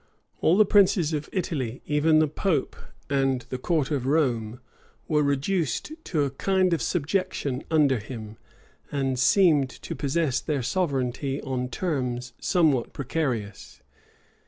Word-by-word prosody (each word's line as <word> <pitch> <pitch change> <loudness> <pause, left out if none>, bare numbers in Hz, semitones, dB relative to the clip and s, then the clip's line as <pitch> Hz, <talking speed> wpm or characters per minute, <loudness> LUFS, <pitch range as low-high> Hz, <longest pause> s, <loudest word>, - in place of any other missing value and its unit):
All 170 +4 +3
the 215 - +6
princes 195 -5 +3
of 150 0 -3
Italy, 140 - -3
even 155 +2 +3
the 155 0 +4
pope 155 -1 -1 0.3
and 135 -2 +1
the 130 - -4
court 155 0 0
of 135 -3 -1
Rome, 125 -6 0 0.5
were 150 -2 +2
reduced 145 - 0
to 155 -5 0
a 140 - -1
kind 185 +5 +1
of 165 - 0
subjection 155 -5 -1
under 145 -6 +3
him, 110 -1 -8 0.5
and 135 -3 -1
seemed 150 -3 +4
to - - -8
possess 145 -2 0
their 145 -5 -2
sovereignty 135 -4 -1
on 125 -2 -3
terms 125 -6 -3
somewhat 155 -9 +2
precarious. 120 - -4
140 Hz, 135 wpm, -26 LUFS, 130-165 Hz, 0.5 s, the